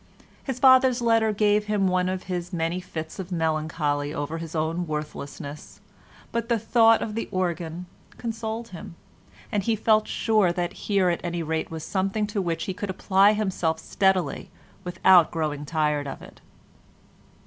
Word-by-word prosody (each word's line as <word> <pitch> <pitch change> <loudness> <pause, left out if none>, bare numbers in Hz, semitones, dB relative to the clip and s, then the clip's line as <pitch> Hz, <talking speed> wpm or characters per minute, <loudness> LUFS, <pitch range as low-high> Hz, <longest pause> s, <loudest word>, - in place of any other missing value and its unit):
His 265 -3 -4
father's 260 -1 +6
letter 225 -2 +3
gave 210 0 +2
him 210 -2 +1
one 185 0 +1
of 185 0 -3
his 180 -1 -4
many 170 +1 -1
fits 160 -2 -7
of 190 0 -6
melancholy 155 -3 -1
over 150 +3 -3
his 165 0 -7
own 165 +2 -1
worthlessness, 150 -1 -6 0.5
but 235 0 -2
the 235 - +3
thought 225 +1 +4
of 215 - -4
the 230 - -3
organ 175 -1 -2 0.3
consoled 230 0 -4
him, 170 -3 -9 0.6
and 205 - +1
he 225 +3 +1
felt 215 0 +2
sure 215 -6 +2
that 175 0 -2 0.2
here 195 -3 +3
at 170 - -3
any 170 -1 -2
rate 160 0 -2
was 160 -1 -6
something 195 +4 -1
to 205 -1 -2
which 165 -3 -2
he 190 - -3
could 205 +2 -5
apply 195 +2 +4
himself 185 -6 -1
steadily 190 +2 0 0.3
without 180 -1 +5
growing 150 -3 -3
tired 150 -2 0
of - - -7
it. - - -14
180 Hz, 160 wpm, -25 LUFS, 160-210 Hz, 0.6 s, father's